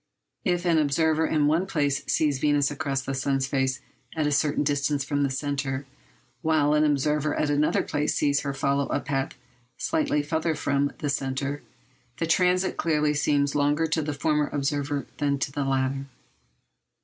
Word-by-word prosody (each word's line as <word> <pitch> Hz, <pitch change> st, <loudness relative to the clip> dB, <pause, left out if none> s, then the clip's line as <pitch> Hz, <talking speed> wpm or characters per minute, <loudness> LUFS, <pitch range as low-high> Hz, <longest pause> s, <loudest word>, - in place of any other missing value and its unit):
If 175 Hz, -2 st, 0 dB
an 165 Hz, -2 st, +4 dB
observer 160 Hz, +2 st, +2 dB
in 150 Hz, -2 st, +2 dB
one 165 Hz, +6 st, +2 dB
place 145 Hz, -5 st, 0 dB
sees 145 Hz, -4 st, +1 dB
Venus 145 Hz, -1 st, +2 dB
cross 140 Hz, -2 st, -2 dB
the 135 Hz, -, -3 dB
sun's 135 Hz, 0 st, 0 dB
face 135 Hz, -1 st, -1 dB, 0.3 s
at 155 Hz, -2 st, 0 dB
a 150 Hz, -, +1 dB
certain 145 Hz, 0 st, +1 dB
distance 145 Hz, 0 st, 0 dB
from 145 Hz, +1 st, -1 dB
the 140 Hz, -, +2 dB
centre, 135 Hz, 0 st, -2 dB, 0.6 s
while 155 Hz, -2 st, +2 dB
an 150 Hz, 0 st, +4 dB
observer 150 Hz, 0 st, +1 dB
at 150 Hz, -, 0 dB
another 145 Hz, +1 st, +2 dB
place 150 Hz, 0 st, -1 dB
sees 145 Hz, -1 st, +2 dB
her 140 Hz, -, -3 dB
follow 140 Hz, 0 st, 0 dB
a -, -, 0 dB
path 135 Hz, 0 st, -2 dB, 0.4 s
slightly 300 Hz, -, 0 dB
farther 160 Hz, +2 st, -1 dB
from 140 Hz, 0 st, 0 dB
the 145 Hz, -, -3 dB
centre, 135 Hz, +1 st, -2 dB, 0.6 s
the 165 Hz, -, -1 dB
transit 180 Hz, +3 st, +2 dB
clearly 150 Hz, -2 st, +1 dB
seems 145 Hz, -1 st, +1 dB
longer 145 Hz, +2 st, +2 dB
to 160 Hz, 0 st, 0 dB
the 150 Hz, 0 st, -2 dB
former 150 Hz, 0 st, +1 dB
observer 145 Hz, 0 st, -2 dB
than 140 Hz, -1 st, +1 dB
to 140 Hz, -, -2 dB
the 140 Hz, 0 st, -2 dB
latter. 135 Hz, 0 st, -1 dB
145 Hz, 170 wpm, -26 LUFS, 140-150 Hz, 0.6 s, an